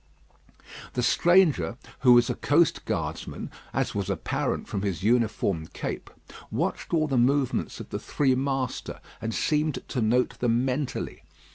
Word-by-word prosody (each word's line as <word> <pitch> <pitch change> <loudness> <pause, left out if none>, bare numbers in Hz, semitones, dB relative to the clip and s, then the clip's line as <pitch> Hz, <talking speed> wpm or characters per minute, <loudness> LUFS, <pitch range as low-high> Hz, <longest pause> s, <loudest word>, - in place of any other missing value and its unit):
The 125 - -1
stranger, 150 - +4 0.2
who 125 -2 +7
was 120 -1 +6
a - - 0
coast 160 +2 +2
guardman, - - -4 0.2
as - - -1
was 100 -1 -2
apparent 95 - -2
from 100 - -3
his 95 -2 -2
uniform 105 -7 +1
cape, - - -5 0.4
watched - - -2
all 155 -2 +2
the 135 -3 0
movements 135 +1 +1
of - - -8
the - - -3
three 135 -3 +1
master, 135 -1 -2 0.2
and 115 +1 -2
seemed 150 +5 0
to 125 - -1
note 120 +3 +1
them 120 +1 +2
mentally. 130 0 -3
125 Hz, 145 wpm, -27 LUFS, 110-140 Hz, 0.4 s, who